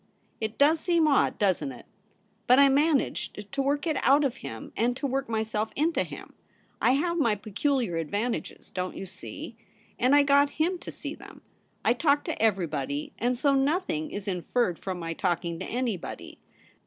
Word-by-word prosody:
It 220 0 -3
does 305 +3 +5
seem 335 -2 +2
odd, 280 -3 +3
doesn't 180 -9 +1
it? 125 - -12 0.6
But 250 - +7
I 280 0 +7
managed 275 -7 0
to 275 0 -1
work 285 +2 0
it 315 -3 0
out 280 +2 +5
of 265 -1 -1
him 285 +2 -8
and 245 +2 +1
to 285 - -3
work 270 -2 -1
myself 220 -1 -1
into 320 +3 +1
him. - - -10 0.5
I 250 - +4
have 340 +5 0
my 230 -8 +3
peculiar 215 - -1
advantages, 205 +9 -3
don't 185 0 -4
you - - -5
see? 220 - -9 0.4
and 255 +4 +4
I 290 - +6
got 285 0 +3
him 350 +3 +1
to - - -7
see - - -6
them. - - -13 0.4
I - - +5
talk 285 +3 +2
to 325 - -4
every 200 -5 +3
body, 145 -1 -4
and 245 +1 +1
so 280 +2 +3
nothing 275 - 0
is 205 0 -6
inferred 180 +1 0
from 190 -2 -4
my 165 -1 -4
talking 170 -1 -1
to - - -4
anybody. 235 -7 -4
245 Hz, 180 wpm, -27 LUFS, 195-285 Hz, 0.6 s, But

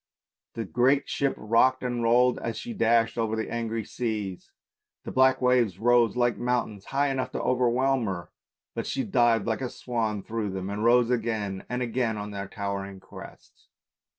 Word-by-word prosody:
The 115 -1 -3
great 130 +7 +2
ship 140 -1 0
rocked 115 +4 +2
and 120 -1 -2
rolled 120 +2 +3
as 115 -1 -4
she 240 - -6
dashed 115 - +2
over 110 -1 0
the 110 - -3
angry 115 -2 -2
sea, 105 -6 -3 0.6
the - - -6
black 130 0 +3
waves 125 -7 +3
rose 120 +2 +3
like 120 -1 +2
mountains, 120 -5 -1
high 140 +1 0
enough 135 -1 -2
to - - -2
overwhelm 125 0 +2
her, 85 -3 -5 0.4
but - - -4
she 135 - -1
dived 115 -1 +2
like 115 +2 -1
a 130 - -2
swan 110 -6 -3
through 110 -2 -3
them 95 +1 -4
and 105 +1 -3
rose 120 +1 +4
again 110 -5 -2
and 125 +1 -1
again 120 -2 -1
on 105 0 -5
their 100 -1 -5
towering 100 -1 -5
crests. - - -14
115 Hz, 175 wpm, -27 LUFS, 105-125 Hz, 0.6 s, rose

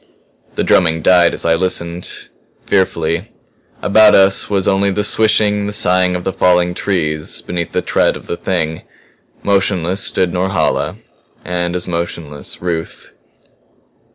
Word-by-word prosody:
The - - -1
drumming 80 -3 +2
died 90 -2 +5
as - - -4
I 85 - +3
listened 85 0 -2 0.4
fearfully. 85 0 0 0.5
About 105 +1 +5
us 95 0 +4
was 100 -3 0
only 100 +1 +2
the 105 +1 -1
swishing, 105 -1 +2
the 105 - -4
sighing 90 -2 +1
of 90 - -4
the 95 - -2
falling 90 -1 +2
trees 75 -6 -2
beneath 85 -2 -4
the - - -1
tread - - +1
of - - -15
the - - -4
Thing. 80 -3 -2 0.6
Motionless 95 -2 0
stood 90 -2 0
Norhala; 95 +1 -1 0.5
and 85 0 -2
as 90 - -3
motionless 85 -3 -5
Ruth. 85 -2 -5
90 Hz, 135 wpm, -16 LUFS, 85-95 Hz, 0.6 s, died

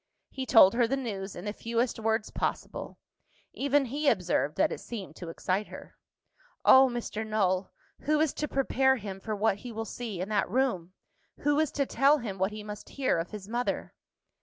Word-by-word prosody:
He 265 -1 -5
told 195 -5 +7
her 235 0 +3
the 270 +3 0
news, 200 -7 -5
in 175 - -8
the 205 - -3
fewest 230 +2 -1
words 220 0 0
possible. - - -4 0.6
Even 280 0 +2
he 285 +4 +1
observed 180 - 0
that - - +3
it - - -4
seemed 195 -9 -7
to 175 - -7
excite 185 +4 -1
her. - - -11 0.7
"Oh, 265 0 +8
Mr. 235 -2 -4
Null! 200 -4 0 0.3
who 305 +1 +1
is 310 -2 +2
to 300 - -3
prepare 265 -1 +2
him 200 -5 -6
for 215 +2 -4
what 205 -1 +1
he 245 +3 -8
will 225 0 -4
see 220 -4 -6
in 185 +3 -3
that 205 -4 +1
room? 190 -7 0 0.5
Who 290 0 +2
is 315 -2 +1
to 280 - +1
tell 280 +3 +4
him 210 -8 -6
what 190 +2 +1
he 210 0 -7
must 210 0 -8
hear 260 -10 +2
of 165 - -4
his 205 -2 -8
mother?" 240 +3 -2
225 Hz, 195 wpm, -29 LUFS, 195-265 Hz, 0.7 s, Oh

